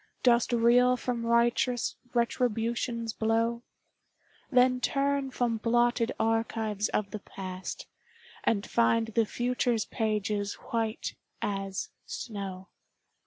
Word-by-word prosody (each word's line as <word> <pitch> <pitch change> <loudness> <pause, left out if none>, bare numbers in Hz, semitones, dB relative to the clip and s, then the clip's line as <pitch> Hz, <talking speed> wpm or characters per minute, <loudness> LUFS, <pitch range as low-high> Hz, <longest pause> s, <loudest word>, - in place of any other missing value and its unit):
Dost 240 -1 +4
reel 245 +2 +5
from 240 -2 -2
righteous 235 +1 +2 0.2
Retribution's 235 -1 0
blow? 230 +2 +1 0.9
Then 255 -1 +4
turn 275 +1 +1
from 245 -3 0
blotted 240 +1 +2
archives 220 -2 0
of 205 -2 -1
the 215 - -4
past, 185 -1 -7 0.6
And 205 -2 +1
find 230 -1 +2
the 225 0 +1
future's 245 -2 0
pages 210 -2 -1
white 225 -1 -3 0.3
as 195 -2 -3 0.2
snow. 195 -4 -6
230 Hz, 100 wpm, -29 LUFS, 215-240 Hz, 0.9 s, reel